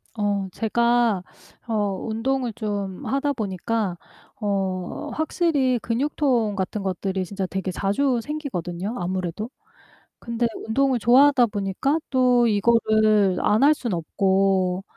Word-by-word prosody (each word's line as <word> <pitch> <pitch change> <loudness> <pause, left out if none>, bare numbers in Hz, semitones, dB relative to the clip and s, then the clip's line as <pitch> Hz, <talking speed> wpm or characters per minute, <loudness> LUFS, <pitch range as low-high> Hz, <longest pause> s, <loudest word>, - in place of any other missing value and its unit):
어 205 -2 -1
제가 235 -3 +1 0.4
어 230 - -3 0.3
운동을 245 +2 -1
좀 205 -4 -4
하다 280 +1 0
보니까 205 -3 -2 0.4
어 190 -4 -2
확실히 300 -6 +1
근육통 240 -3 0
같은 195 +1 -3
것들이 190 0 -2
진짜 195 0 -4
되게 190 0 -3
자주 235 +8 0
생기거든요, 215 - -4
아무래도. 185 +3 -3 0.7
근데 235 0 -1 0.2
운동을 265 +3 +2
좋아하다 255 +3 +5
보니까 205 +8 -1
또 250 -2 +3
이거를 215 -2 +3
안 210 +1 +2
할 300 +2 +6
수는 235 -9 -3
없고 190 +2 +1
215 Hz, 250 characters per minute, -23 LUFS, 190-245 Hz, 0.7 s, 할